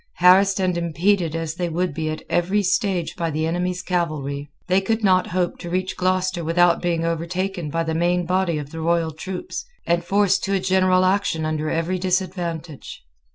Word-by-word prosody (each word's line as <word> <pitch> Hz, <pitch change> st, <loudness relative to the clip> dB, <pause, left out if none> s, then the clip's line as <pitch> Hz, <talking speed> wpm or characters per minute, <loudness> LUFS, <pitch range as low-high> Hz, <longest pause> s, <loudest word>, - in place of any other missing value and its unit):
Harassed 190 Hz, +3 st, +5 dB
and 185 Hz, -2 st, +1 dB
impeded 170 Hz, 0 st, +1 dB
as 165 Hz, -1 st, -3 dB
they 175 Hz, +1 st, -2 dB
would 175 Hz, 0 st, -1 dB
be 155 Hz, +1 st, -2 dB
at 155 Hz, -, -5 dB
every 190 Hz, +4 st, +1 dB
stage 190 Hz, -2 st, 0 dB
by 170 Hz, -2 st, -2 dB
the 155 Hz, +1 st, -1 dB
enemy's 180 Hz, +2 st, -2 dB
cavalry, 150 Hz, -5 st, -2 dB, 0.2 s
they 185 Hz, +1 st, +3 dB
could 220 Hz, +3 st, -1 dB
not 185 Hz, -2 st, +4 dB
hope 180 Hz, 0 st, -1 dB
to 175 Hz, -, -7 dB
reach 185 Hz, +1 st, -2 dB
Gloucester 185 Hz, -1 st, 0 dB
without 170 Hz, +1 st, +3 dB
being 170 Hz, -2 st, 0 dB
overtaken 170 Hz, +1 st, -2 dB
by 165 Hz, +3 st, -1 dB
the 160 Hz, -1 st, -2 dB
main 175 Hz, +2 st, +1 dB
body 180 Hz, -2 st, +1 dB
of 145 Hz, -1 st, -6 dB
the 165 Hz, -, -6 dB
royal 165 Hz, 0 st, +1 dB
troops, 180 Hz, +4 st, -6 dB, 0.2 s
and 170 Hz, 0 st, +1 dB
forced 195 Hz, +1 st, +2 dB
to 195 Hz, 0 st, 0 dB
a -, -, +2 dB
general 185 Hz, 0 st, +3 dB
action 185 Hz, -4 st, +1 dB
under 155 Hz, 0 st, -1 dB
every 165 Hz, +3 st, -1 dB
disadvantage. 175 Hz, -4 st, -3 dB
175 Hz, 185 wpm, -22 LUFS, 165-185 Hz, 0.2 s, Harassed